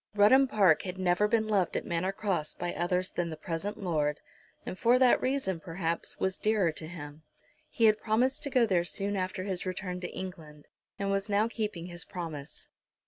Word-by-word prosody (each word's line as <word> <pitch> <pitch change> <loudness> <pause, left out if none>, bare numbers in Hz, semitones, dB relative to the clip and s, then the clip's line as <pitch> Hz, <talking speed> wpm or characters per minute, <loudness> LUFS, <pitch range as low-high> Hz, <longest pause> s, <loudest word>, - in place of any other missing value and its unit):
Rudham 260 +7 +6
Park 195 - +4
had 185 -1 -6
never 185 +2 +2
been 220 0 +1
loved 195 -5 +1
at - - -4
Manor 175 +3 -1
Cross 195 -6 -2
by 175 0 -3
others 180 +1 0
than 175 -1 -2
the 160 - -6
present 180 +5 -4
Lord, 150 -4 0 0.5
and - - -4
for 235 +6 +4
that 255 -1 +5
reason, 255 -10 0
perhaps, 165 -1 -3
was 190 0 0
dearer 210 -6 +2
to 155 0 -6
him. 150 -2 -9 0.5
He 230 - +2
had 215 -1 +4
promised 240 +5 +1
to 280 - -2
go 250 -3 +4
there 185 -5 +2
soon 200 +3 -2
after 185 0 -2
his 190 -2 -3
return 185 -1 -4
to 180 - -5
England, 155 -5 -8 0.3
and 200 0 -1
was 195 +1 -1
now 205 +2 +3
keeping 210 -7 -4
his 175 -1 -5
promise. 160 -5 -7
185 Hz, 195 wpm, -30 LUFS, 170-210 Hz, 0.5 s, Rudham